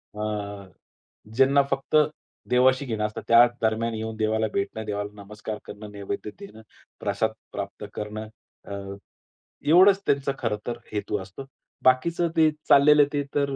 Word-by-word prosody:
अ, 105 -2 -4 0.7
ज्यांना 135 +2 +5
फक्त 135 +2 -1 0.5
देवाशी 130 +2 +4
घेणं 110 -3 -2
असतात 105 - -5
त्या 115 +1 +8 0.2
दरम्यान 110 +1 0
येऊन 110 0 -4
देवाला 110 0 +1
भेटणं, 110 +2 -2
देवाला 105 -1 -3
नमस्कार 105 +1 -7
करणं, 105 0 -9
नैवेद्य 100 +1 -5
देणं, 195 - -11 0.4
प्रसाद - - 0 0.2
प्राप्त - - -6
करणं. 105 +1 -5 0.4
अ, - - -10 1.0
एवढंच 190 +4 +7
त्यांचं 140 -1 +1
खरं 115 -4 -1
तर 120 -1 -2
हेतू 105 0 -2
असतो. 95 +8 -10 0.4
बाकीचं 165 +7 +3
ते 160 -1 +6 0.2
चाललेलं 145 +1 +7
ते 145 -1 0
तर, 140 -1 +1
110 Hz, 135 wpm, -25 LUFS, 105-140 Hz, 1.0 s, त्या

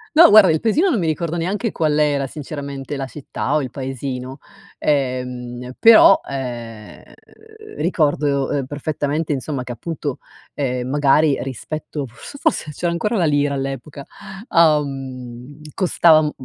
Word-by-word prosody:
No 340 - +9
guarda, 205 -5 +8
il 155 - +1
paesino 310 - +2
non 240 - +1
mi 165 - -1
ricordo 165 +2 -2
neanche 200 +6 -2
qual 155 -2 0
era 145 -2 +1
sinceramente, 140 -1 -6
la 135 -1 -4
città 145 +1 -4
o 150 - +1
il 125 - -6
paesino. 130 0 -5 0.4
Ehm, 125 -3 -2
però, 225 -3 +8
ehm, 120 -5 -7 0.8
ricordo, 145 -4 0
ehm, 140 -3 -1
perfettamente 150 +1 -2
insomma 135 -1 -4
che 125 - -7
appunto, 145 +2 -5 0.3
ehm, 125 -3 -2
magari 145 +1 +3
rispetto 145 +3 -5
f 120 - -15
s 285 - -9
forse 155 - 0
c'era 175 +4 -2
ancora 210 +7 -1
la 175 - +2
lira 145 -1 +1
all'epoca, 135 +1 -5 0.4
uhm, 135 -4 0
costava, 170 -4 +4
mhmm, 150 -1 -1
145 Hz, 140 wpm, -20 LUFS, 130-155 Hz, 0.8 s, No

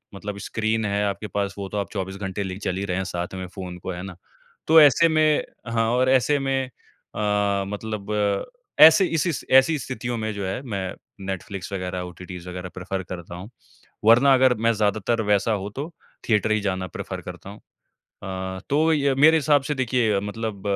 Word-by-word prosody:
मतलब 100 +1 -6
स्क्रीन 110 +1 -1
है 100 0 0
आपके 100 +1 -3
पास 100 -1 -2
वो 100 - -4
तो 105 - -4
आप 100 - -2
24 95 -2 -4
घंटे 95 0 -4
लेके 95 0 -5
चल 95 -3 -2
ही 100 - -2
रहे 90 -2 -2
हैं 95 - -1
साथ 90 -1 -4
में 95 - -5
फोन 90 -2 -6
को, 90 - -6
है 90 -1 -6
ना? 95 -2 -8 0.5
तो 160 +1 +8
ऐसे 150 +3 +6
में 155 -1 +3 0.3
हाँ 115 -1 +2
और 130 +1 +2
ऐसे 135 +3 +3
में 135 -1 0
अ, 105 -4 -2
मतलब 105 0 -5 0.7
ऐसे 160 +5 +9
इस 165 0 0
इस 165 - -2
ऐसी 135 +4 +6
स्थितियों 120 -2 -4
में 110 -1 -2
जो 100 -1 -4
है 95 +6 -3
मैं 100 -6 -4 0.3
नेटफ्लिक्स 95 0 -5
वग़ैरह, 90 -1 -3
ओटीटीस 90 0 -9
वग़ैरह 90 0 -6
प्रेफर 95 +1 -4
करता 85 -1 -8
हूँ। 95 +5 -9 0.6
वरना 125 +5 +6
अगर 130 -1 +5
मैं 115 - +4
ज्यादातर 110 +2 0
वैसा 105 +2 +2
हो 100 -2 -2
तो 145 +4 -4 0.4
थिएटर 110 0 +2
ही 110 - +3
जाना 95 -2 -2
प्रेफर - - -6
करता - - -9
हूँ। 100 - -11 0.4
अ, 95 -1 -7
तो 155 +3 +3
य 140 -3 +2
मेरे 160 +3 +7
हिसाब 145 -2 +3
से - - +2
देखिए 120 -6 +1
मतलब 105 0 -5
105 Hz, 195 wpm, -24 LUFS, 95-130 Hz, 0.7 s, ऐसे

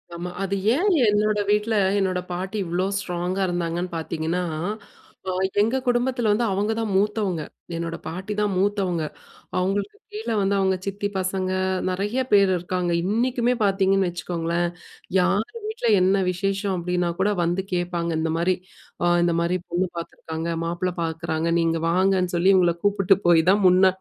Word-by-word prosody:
ஆமா. 175 +1 -5
அது 195 +1 -1 0.2
ஏன் 365 +8 +1 0.2
என்னோட 210 0 +2
வீட்ல 210 +2 +2 0.2
என்னோட 190 -2 +1
பாட்டி 190 +4 -3
இவ்ளோ 175 +2 -1
ஸ்ட்ராங்கா 180 0 -2
இருந்தாங்கன்னு 175 0 -2
பார்த்தீங்கன்னா, 160 +2 -2 0.9
அ - - +1 0.3
எங்க 230 +5 +2
குடும்பத்தில 245 -2 +1
வந்து 235 +3 +2
அவங்க 200 +3 0
தான் 220 -2 -2
மூத்தவங்க. 200 -4 +1 0.3
என்னோட 165 0 -3
பாட்டி 185 +6 -4
தான் 205 -1 +1
மூத்தவங்க. 190 -4 0 0.5
அவுங்களுக்கு 195 - -1 0.2
கீழே 420 - -3
வந்து 200 +1 +1
அவுங்க 190 -1 +2
சித்தி 200 +1 -2
பசங்க 185 0 -1 0.4
நிறைய 205 +7 -1
பேர் 200 -1 +6
இருக்காங்க. 180 0 -2
இன்னிக்குமே 240 +5 +1
பார்த்தீங்கன்னு 195 -1 +2
வச்சுக்கோங்களேன். 175 0 -2 0.5
யார் 190 +4 +2 0.2
வீட்ல 435 - -3
என்ன 190 +2 +4
விசேஷம் 195 +1 -1
அப்பிடின்னா 175 0 -1
கூட 200 +2 +3
வந்து 175 +3 0
கேட்பாங்க. 175 -1 -1
இந்தமாரி 165 +3 +1 0.5
அ - - +3 0.2
இந்தமாரி 170 +1 +1
பொண்ணு 180 +2 +1
பாத்துருக்காங்க. 165 0 -5 0.2
மாப்பிள 175 +2 -1
பாக்குறாங்க 160 0 -2
நீங்க 165 0 +1
வாங்கன்னு, 185 0 +2
சொல்லி 185 +3 +4
இவுங்கள 175 -2 +3
கூப்பிட்டு 195 -1 +3
போய் 165 -2 +6
தான், 205 +1 +2
முன்ன 185 +1 +6
185 Hz, 140 wpm, -24 LUFS, 175-205 Hz, 0.9 s, பேர்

